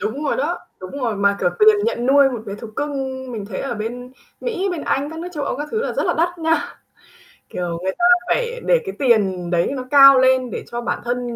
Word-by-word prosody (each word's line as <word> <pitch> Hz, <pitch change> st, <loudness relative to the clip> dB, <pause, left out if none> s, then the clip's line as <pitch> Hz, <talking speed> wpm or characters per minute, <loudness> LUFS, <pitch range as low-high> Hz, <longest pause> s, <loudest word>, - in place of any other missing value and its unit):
Đúng 250 Hz, +9 st, -3 dB
rồi 285 Hz, -, 0 dB
đó, 315 Hz, +6 st, -1 dB, 0.2 s
đúng 185 Hz, -, -8 dB
rồi. 225 Hz, -4 st, -1 dB
Mà, 200 Hz, 0 st, +2 dB
kiểu, 180 Hz, -, +2 dB
tiền 430 Hz, 0 st, +6 dB
nhận 245 Hz, -, -1 dB
nuôi 275 Hz, +1 st, +5 dB
một 240 Hz, -3 st, -5 dB
bé 200 Hz, -, -5 dB
thú 210 Hz, +3 st, -9 dB
cưng 290 Hz, +1 st, -2 dB, 0.4 s
mình 210 Hz, -4 st, -5 dB
thấy 195 Hz, -3 st, -5 dB
ở 270 Hz, -3 st, -3 dB
bên 245 Hz, +4 st, -6 dB, 0.3 s
Mỹ, 405 Hz, -5 st, -2 dB
bên 350 Hz, -3 st, -4 dB
Anh, 280 Hz, +2 st, -1 dB
các 320 Hz, -, -8 dB
nước 345 Hz, +2 st, -5 dB
châu 290 Hz, -2 st, -2 dB
Âu -, -, -2 dB
các 295 Hz, +2 st, -5 dB
thứ 445 Hz, -, -1 dB
là -, -, -2 dB
rất -, -, -1 dB
là -, -, +1 dB
đắt 345 Hz, +2 st, 0 dB
nha. 325 Hz, 0 st, -1 dB, 0.7 s
Kiểu, 175 Hz, -2 st, -4 dB
người 190 Hz, -, 0 dB
ta 350 Hz, -, +1 dB, 0.2 s
phải -, -, -1 dB
để -, -, +4 dB
cái 390 Hz, -, -5 dB
tiền 200 Hz, -9 st, +1 dB
đấy 170 Hz, +5 st, +1 dB
nó 255 Hz, -, -4 dB
cao 275 Hz, -1 st, +9 dB
lên 260 Hz, -1 st, +3 dB
để -, -, -5 dB
cho 240 Hz, 0 st, -3 dB
bản 240 Hz, -, -2 dB
thân 240 Hz, 0 st, -3 dB
260 Hz, 250 wpm, -20 LUFS, 220-320 Hz, 0.7 s, cao